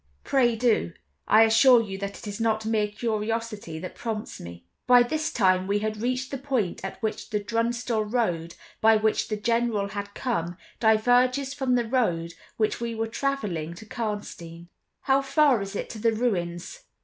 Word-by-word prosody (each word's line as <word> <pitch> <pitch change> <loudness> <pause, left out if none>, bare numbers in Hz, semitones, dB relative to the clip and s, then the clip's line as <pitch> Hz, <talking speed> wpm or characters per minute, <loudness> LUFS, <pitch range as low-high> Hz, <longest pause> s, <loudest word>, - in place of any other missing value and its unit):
"Pray 245 -4 +2
do; 220 - +1 0.3
I 220 +1 +7
assure 235 +3 +6
you 195 -4 -4
that 200 0 -5
it - - -11
is 205 +1 -5
not 220 -1 0
mere 220 -1 +1
curiosity 215 -4 -3
that 180 +3 -7
prompts 220 -2 -5
me." 85 0 -10 0.2
By 245 -1 +7
this 310 +5 -2
time 185 -3 +2
we 200 +1 +1
had 215 0 -3
reached 255 +2 -2
the 275 - -4
point 255 -12 -2
at 190 - -6
which 220 - -3
the 210 - 0
Drunstall 230 +1 -1
road, 170 -9 -1 0.3
by 220 0 +6
which 215 0 +1
the 215 - -2
General 230 -2 0
had 200 0 -6
come, 175 -9 -2 0.2
diverges 245 +5 +3
from 265 -3 0
the 240 -1 +1
road 175 -10 0 0.2
which 215 +1 0
we 235 -1 -3
were 225 0 -1
traveling 210 - -3
to 220 - -11
Karnstein. 205 -7 -6 0.3
"How 270 0 +3
far 275 -4 +3
is 195 +1 -6
it - - -3
to 220 - -8
the 225 +1 +2
ruins?" 185 - -2
220 Hz, 175 wpm, -26 LUFS, 200-240 Hz, 0.3 s, I